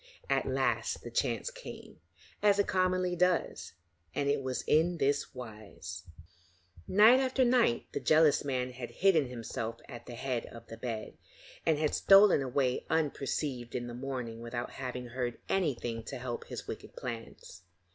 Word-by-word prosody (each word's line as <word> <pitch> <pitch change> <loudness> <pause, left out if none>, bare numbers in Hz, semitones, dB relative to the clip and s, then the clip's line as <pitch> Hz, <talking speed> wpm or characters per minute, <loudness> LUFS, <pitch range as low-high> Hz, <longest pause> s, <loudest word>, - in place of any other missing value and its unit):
At - - +2
last - - 0
the - - -7
chance - - 0
came, - - -10 0.4
as 205 -1 +5
it 200 - +3
commonly 185 -1 +1
does, 180 0 0 0.4
and 140 - 0
it 140 -1 +2
was 130 -1 -3
in 170 +3 +3
this 140 -1 0
wise: 105 -7 -8 0.8
Night 220 +6 +7
after 260 -1 +2
night 240 - +3
the - - -2
jealous 155 -1 +4
man 130 -2 -1
had 125 -1 -7
hidden 175 -8 +3
himself 115 -1 -5
at 120 -3 -10
the 120 - -7
head 125 -1 -2
of 115 - -11
the 115 - -10
bed, 115 -2 -5 0.5
and 160 - +4
had 155 0 0
stolen 195 -5 +7
away 130 -1 0
unperceived 140 -5 -1
in 120 - -2
the 120 - -6
morning 125 -3 -5
without 120 +1 -4
having 125 -2 -5
heard 120 -1 -3
anything 120 -10 -1
to 135 - -5
help 125 -1 -5
his - - -7
wicked - - -7
plans. 115 -2 -7
130 Hz, 155 wpm, -31 LUFS, 120-170 Hz, 0.8 s, Night